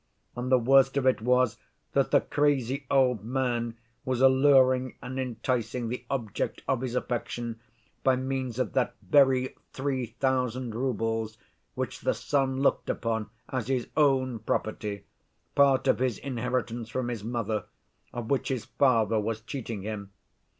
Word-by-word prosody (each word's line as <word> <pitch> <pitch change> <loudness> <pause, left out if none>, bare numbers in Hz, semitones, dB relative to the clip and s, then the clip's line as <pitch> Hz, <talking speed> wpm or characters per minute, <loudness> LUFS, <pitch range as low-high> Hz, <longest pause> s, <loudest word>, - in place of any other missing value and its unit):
And 125 +1 -3
the 130 - +7
worst 135 +3 +4
of 135 - +1
it 130 -4 +3
was 125 0 +2 0.4
that - - +2
the - - +4
crazy 140 -2 0
old 125 -6 +3
man 120 -1 -1 0.3
was 130 -2 -1
alluring 130 -1 +5
and 130 +1 -5
enticing 120 -1 -2
the 125 - -5
object 120 -7 -3
of 130 - +1
his 125 -2 -3
affection 120 -2 -3 0.4
by 130 -1 +4
means 130 -2 -3
of 130 - -1
that 125 -4 +1
very 130 +4 +4 0.2
three 130 -2 -2
thousand 125 0 -1
roubles, 115 -3 -1 0.4
which - - -3
the - - +1
son 135 -2 0
looked - - +2
upon 110 -2 -1 0.2
as 130 -4 -2
his 130 -3 -1
own 130 -5 +2
property, 105 -2 -2 0.5
part 140 -2 +4
of - - +3
his 125 -5 0
inheritance 125 -3 -3
from 125 +1 -2
his 115 -4 -4
mother, 110 -2 -2 0.5
of 120 0 -5
which 140 - +1
his 125 -5 -2
father 115 -5 +2
was 110 +1 -2
cheating 115 -4 -5
him. 105 -2 -5
125 Hz, 150 wpm, -28 LUFS, 115-130 Hz, 0.5 s, the